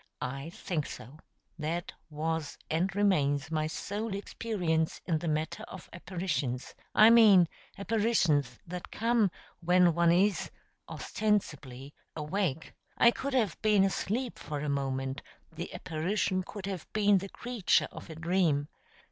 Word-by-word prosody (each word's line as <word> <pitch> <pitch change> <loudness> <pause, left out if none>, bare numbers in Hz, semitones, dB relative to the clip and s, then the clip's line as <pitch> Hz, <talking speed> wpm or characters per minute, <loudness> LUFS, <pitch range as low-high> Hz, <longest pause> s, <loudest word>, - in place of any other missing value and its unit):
I 135 +4 -4
think 165 -3 -3
so. 135 +7 -10 0.4
That 165 +3 -3 0.2
was 160 0 -3
and 170 +4 +1
remains 155 -7 +2
my 155 -1 0
sole 205 +6 -4
experience 180 -6 -1
in 165 -3 +1
the 170 - -4
matter 155 0 -1
of 185 - -11
apparitions 170 -8 -3 0.2
I 215 +2 +8
mean 210 -7 +7 0.3
apparitions 195 - +1
that 180 +1 -7
come 230 -2 +2 0.3
when 180 0 +4
one 170 0 +4
is 190 +2 +2 0.4
(ostensibly) 145 -11 -2 0.2
awake. 160 -1 -2 0.2
I 235 - +7
could 275 +2 -3
have 215 -10 +1
been 210 -2 +4
asleep 220 +5 -1
for 150 -1 -5
a 150 - -2
moment; 135 -1 -2 0.3
the - - -6
apparition 185 +3 -1
could 195 +1 -8
have 190 -4 -6
been 205 -2 +4
the 195 +2 -7
creature 235 -4 +1
of - - -10
a 160 - -7
dream. 160 -3 +1
175 Hz, 135 wpm, -30 LUFS, 155-205 Hz, 0.4 s, I